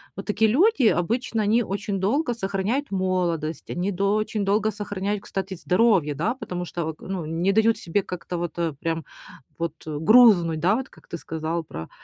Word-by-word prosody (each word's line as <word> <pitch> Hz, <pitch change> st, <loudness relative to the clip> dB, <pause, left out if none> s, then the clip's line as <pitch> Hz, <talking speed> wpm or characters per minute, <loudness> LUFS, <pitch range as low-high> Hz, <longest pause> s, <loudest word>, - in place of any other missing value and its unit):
Вот 195 Hz, -, -7 dB
такие 220 Hz, +1 st, +2 dB
люди 360 Hz, -, +4 dB
обычно 225 Hz, +5 st, 0 dB
они 220 Hz, +3 st, +3 dB
очень 200 Hz, -1 st, -3 dB
долго 240 Hz, +8 st, +1 dB
сохраняют 205 Hz, +6 st, -2 dB
молодость, 175 Hz, -5 st, -1 dB
они 180 Hz, +3 st, -1 dB
дол 200 Hz, +2 st, +1 dB
очень 215 Hz, -1 st, -1 dB
долго 210 Hz, +2 st, +2 dB
сохраняют, 205 Hz, 0 st, -3 dB
кстати, 195 Hz, 0 st, -4 dB
здоровье, 180 Hz, -4 st, +2 dB
да, 210 Hz, -, -1 dB
потому 180 Hz, -9 st, -5 dB
что 170 Hz, -1 st, -4 dB
вот 160 Hz, -1 st, -5 dB
к -, -, -26 dB
ну 185 Hz, -4 st, -4 dB
не 165 Hz, +5 st, 0 dB
дают 220 Hz, +2 st, +3 dB
себе 185 Hz, +4 st, -1 dB
как-то 180 Hz, 0 st, -5 dB
вот 170 Hz, -2 st, -3 dB, 0.3 s
прям 165 Hz, -1 st, -2 dB, 0.5 s
вот 170 Hz, -2 st, -2 dB
грузнуть, 170 Hz, +1 st, +5 dB
да, 185 Hz, +6 st, +3 dB
вот 265 Hz, +2 st, -4 dB
как -, -, -20 dB
ты 170 Hz, -, -5 dB
сказал 160 Hz, +1 st, -3 dB
про 80 Hz, -, -8 dB
195 Hz, 180 wpm, -24 LUFS, 170-215 Hz, 0.5 s, грузнуть